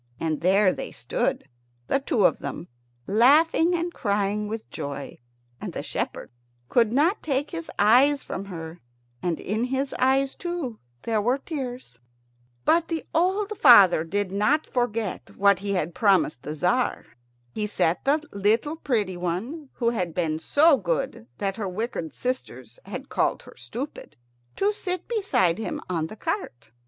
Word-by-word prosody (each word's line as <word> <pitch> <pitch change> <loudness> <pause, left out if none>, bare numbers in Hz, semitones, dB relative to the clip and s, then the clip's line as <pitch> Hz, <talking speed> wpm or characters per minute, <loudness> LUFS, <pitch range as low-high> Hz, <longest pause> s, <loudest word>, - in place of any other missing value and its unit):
And 160 -2 -1
there 190 +2 +4
they - - -6
stood, - - -2 0.4
the 275 - +1
two 230 -7 +1
of - - +3
them, - - -6 0.4
laughing 310 - +4
and 345 0 -2
crying 205 0 -1
with 220 +1 -5
joy. 140 -1 -6 0.4
And - - -5
the - - -4
shepherd - - -4 0.4
could 230 -3 +3
not 315 - +2
take 285 -1 -1
his 335 -2 -6
eyes 260 +7 +5
from 195 - -5
her, 165 -3 -8 0.4
and 175 -3 -1
in 220 +4 -1
his 265 +2 -2
eyes, 270 +1 +3
too, 340 -10 -4 0.2
there 220 -2 0
were 245 +5 +2
tears. 255 - -6 0.7
But 335 0 +3
the 330 -1 -3
old 390 +5 +1
father 200 - +8
did 200 +3 -2
not 215 +11 +2
forget 230 -5 -3
what 200 -2 +4
he 200 0 -2
had 175 -3 -1
promised 190 - +2
the 150 - -5
Tzar. 240 - 0 0.5
He 210 - -2
set 175 -4 0
the 305 +3 +1
little 225 +10 +1
pretty 210 - -1
one, 220 - -4
who 235 -2 0
had 180 -8 -3
been 160 -3 0
so 295 - +4
good 165 - -2
that 195 0 -2
her 205 -4 -3
wicked 185 -4 -4
sisters 255 - -5
had - - -7
called - - 0
her - - -14
Stupid, 270 +5 -7 0.4
to 410 +2 +1
sit 370 -3 -4
beside 385 - +1
him 220 - -3
on 160 -3 -1
the 215 - -10
cart. 170 - -4
225 Hz, 155 wpm, -25 LUFS, 185-285 Hz, 0.7 s, father